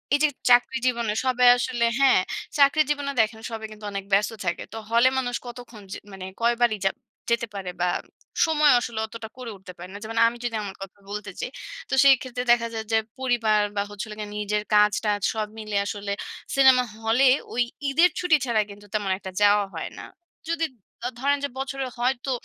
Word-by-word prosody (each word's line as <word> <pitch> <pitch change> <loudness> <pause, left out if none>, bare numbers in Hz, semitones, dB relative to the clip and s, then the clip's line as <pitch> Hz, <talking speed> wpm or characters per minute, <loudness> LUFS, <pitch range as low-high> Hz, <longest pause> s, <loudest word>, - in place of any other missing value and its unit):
এইযে 305 +1 +4 0.2
চাকরি 245 +2 +5
জীবনে 235 -4 0
সবাই 250 -1 +4
আসলে 240 -1 0
হ্যাঁ, 265 -8 +5 0.4
চাকরি 285 +2 +5
জীবনে 285 -1 -2
দেখেন 220 0 -2
সবাই 220 -1 -5
কিন্তু 215 0 -11
অনেক 200 -1 -5
ব্যস্ত 200 +3 +3
থাকে। 175 0 -1
তো - - -6
হলে 235 +2 +5
মানুষ 245 -2 -2
কতক্ষণ 240 -2 -10
যে - - -5 0.2
মানে 190 -1 -7 0.2
কয়বারই 235 -1 +2
যাব 195 - +2 0.4
যেতে 235 0 +1
পারে? 185 -2 -4
বা 180 - +2 0.6
সমজেও 300 -5 +5
আসলে 235 -2 -4
অতটা 220 0 -8
করে 250 -3 -7
উঠতে 190 -1 -11
পারে 175 +1 -9
না। - - -6
যেমন 225 +1 -6
আমি 235 +1 -3
যদি 235 -2 -2
আমার 195 -2 -6
কথা 195 +1 -13
বলতে 210 -1 -5
চাই, - - -3 0.4
তো - - -4
সেই 275 -1 +8
ক্ষেত্রে 250 -1 -4
দেখা 235 -1 0
যায় 220 -1 -4
যে - - +5 0.2
পরিবার 230 -5 +2 0.2
বা 200 - +2
হচ্ছে 205 +1 -6
হলো 210 - -8
গিয়ে 210 -1 -6
নিজের 210 0 -1
কাজ-টাজ 210 0 +3
সব 215 -1 -2
মিলে 215 -1 -3
আসলে 200 0 -4 0.4
সিনেমা 265 -2 +6 0.2
হলে 235 +5 +4 0.3
ওই 245 - +2 0.3
ঈদের 335 +6 +5
ছুটি 355 -4 +4
ছাড়া 230 -3 +2
কিন্তু 205 +1 -13
তেমন 205 -2 -1
একটা 190 -1 -8
যাওয়া 205 0 +5
হয় - - -4
না। - - -8 0.4
যদি 330 -1 0 0.4
দ - - -3 0.2
ধরেন 285 +1 +2
যে - - -4
বছরে 270 0 -3
হয়তো 255 +2 0
230 Hz, 195 wpm, -25 LUFS, 210-255 Hz, 0.6 s, সেই